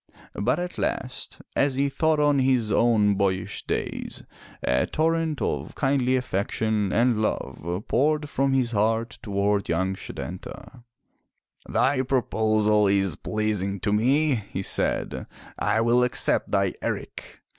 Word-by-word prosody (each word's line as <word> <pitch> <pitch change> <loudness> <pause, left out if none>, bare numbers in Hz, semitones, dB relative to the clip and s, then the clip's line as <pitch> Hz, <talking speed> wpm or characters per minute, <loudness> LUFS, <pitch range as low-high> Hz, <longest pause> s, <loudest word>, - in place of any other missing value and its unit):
But - - 0
at 180 0 -5
last, 125 -1 -4
as 140 -1 +2
he 140 +1 +1
thought 155 +3 +1
on 145 -1 +3
his 130 -5 +2
own 105 -2 +3
boyish 95 -1 -2
days, - - -4 0.4
a 65 0 +1
torrent 160 -1 0
of - - -3
kindly 135 -2 +1
affection 110 -3 -1
and 115 0 +2
love 85 0 -3
poured 150 +2 +1
from 135 -1 0
his 130 -3 +1
heart 110 +2 0
toward 100 -1 0
young 95 +3 0
Setanta. 95 +7 -8 0.9
"Thy 135 -1 +2
proposal 110 -5 +2
is 95 -4 +2
pleasing 105 -1 -1
to 105 - 0
me," 135 +8 +3 0.2
he 95 - -3
said, - - 0 0.3
"I 105 +2 +1
will 120 +2 +3
accept 125 - +2
thy - - +1
eric!" - - -6
115 Hz, 130 wpm, -25 LUFS, 100-135 Hz, 0.9 s, on